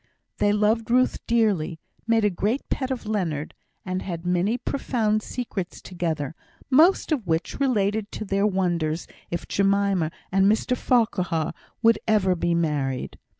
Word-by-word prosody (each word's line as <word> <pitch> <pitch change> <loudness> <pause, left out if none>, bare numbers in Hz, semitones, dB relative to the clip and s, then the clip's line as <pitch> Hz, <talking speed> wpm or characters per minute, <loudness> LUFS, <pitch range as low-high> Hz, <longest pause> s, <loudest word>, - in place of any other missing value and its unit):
They 205 - +3
loved 215 +2 +1
Ruth 255 +2 +3
dearly, 200 -9 +1 0.3
made 225 -2 +3
a 205 - +3
great 210 +9 -1
pet 260 -2 -1
of 260 -3 -3
Leonard, 175 -9 -2 0.3
and 185 0 -2
had 170 -2 -5
many 180 +6 +1
profound 225 -4 0
secrets 215 -7 -5
together, 160 -6 -3 0.4
most 320 +7 +5
of 255 - 0
which 165 +1 -1
related 215 -5 +1
to 215 - -4
their 195 +1 +1
wonders 175 -5 0 0.2
if 170 - -4
Jemima 195 -4 +2 0.2
and 195 +1 +4
Mr 240 +3 +1
Farquhar 185 -11 +1 0.3
would 225 -1 +5
ever 200 -4 +3
be 170 0 0
married. 145 -6 -1
200 Hz, 145 wpm, -25 LUFS, 175-225 Hz, 0.4 s, most